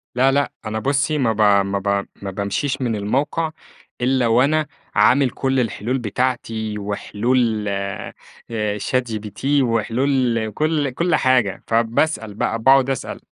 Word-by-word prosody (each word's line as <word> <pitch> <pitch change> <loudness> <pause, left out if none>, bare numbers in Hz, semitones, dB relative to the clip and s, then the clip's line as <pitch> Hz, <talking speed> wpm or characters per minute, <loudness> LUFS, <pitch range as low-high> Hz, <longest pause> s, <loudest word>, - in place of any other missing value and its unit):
لا 130 +2 +4
لأ، 140 +1 +1
أنا 110 0 -2
بُصى 140 +4 +1
ما 120 -5 +1
ب 110 - -2 0.2
ما 100 0 -1
ب 100 0 0 0.2
ما 100 - -4
بامشيش 115 +9 -2
من 120 -3 0
الموقع، 140 +10 -1 0.5
إلّا 125 -1 +2
وأنا 140 +7 +3 0.3
عامل 135 0 +4
كُلّ 135 +1 -1
الحلول 120 +1 -1
بتاعتي، 115 -2 -2
وحلول 110 +2 0
آآ 100 -1 -4 0.7
ChatGPT 120 +3 -1
وحلول 115 0 +1
كُلّ 150 +3 0
كُلّ 170 +7 +1
حاجة، 125 -7 +2
فباسأل 115 0 0
بقى، 115 +2 -1
باقعد 135 +2 +5
أسأل 135 - -4
120 Hz, 130 wpm, -21 LUFS, 110-135 Hz, 0.7 s, باقعد